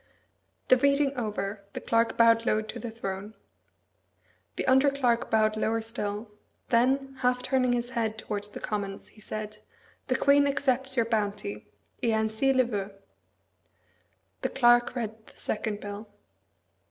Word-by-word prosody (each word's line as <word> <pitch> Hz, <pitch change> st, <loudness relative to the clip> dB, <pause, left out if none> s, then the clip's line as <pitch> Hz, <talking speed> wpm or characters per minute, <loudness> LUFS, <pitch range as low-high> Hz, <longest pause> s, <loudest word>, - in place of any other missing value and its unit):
The 255 Hz, -, +7 dB
reading 280 Hz, +1 st, +2 dB
over, 210 Hz, -3 st, -3 dB
the -, -, -4 dB
Clerk 230 Hz, 0 st, +1 dB
bowed 230 Hz, 0 st, +5 dB
low 215 Hz, -1 st, +1 dB
to 215 Hz, -, -7 dB
the 235 Hz, -, -5 dB
throne. 205 Hz, -1 st, -6 dB, 1.2 s
The -, -, -2 dB
under 265 Hz, +2 st, +5 dB
clerk 245 Hz, -4 st, +1 dB
bowed 215 Hz, -2 st, +3 dB
lower 220 Hz, +1 st, 0 dB
still; 215 Hz, -1 st, -5 dB, 0.4 s
then, 265 Hz, +3 st, +2 dB
half 250 Hz, -1 st, +1 dB
turning 255 Hz, -1 st, +2 dB
his 245 Hz, +1 st, -2 dB
head 220 Hz, -2 st, -1 dB
towards 205 Hz, -1 st, -4 dB
the 210 Hz, -, -9 dB
Commons, 200 Hz, -2 st, -4 dB
he 215 Hz, -, -19 dB
said, 215 Hz, 0 st, -5 dB, 0.5 s
"The -, -, +1 dB
Queen 285 Hz, 0 st, +4 dB
accepts 270 Hz, -1 st, 0 dB
your 230 Hz, -, +3 dB
bounty 210 Hz, -2 st, -2 dB, 0.3 s
et -, -, 0 dB
ainsi 220 Hz, +5 st, +1 dB
le 260 Hz, -1 st, +4 dB
veut." 205 Hz, -4 st, -3 dB, 1.5 s
The -, -, 0 dB
Clerk 240 Hz, -1 st, +4 dB
read 220 Hz, -2 st, -5 dB
the -, -, -18 dB
second 210 Hz, -1 st, -3 dB
bill. 205 Hz, +1 st, -7 dB
230 Hz, 145 wpm, -28 LUFS, 215-255 Hz, 1.5 s, The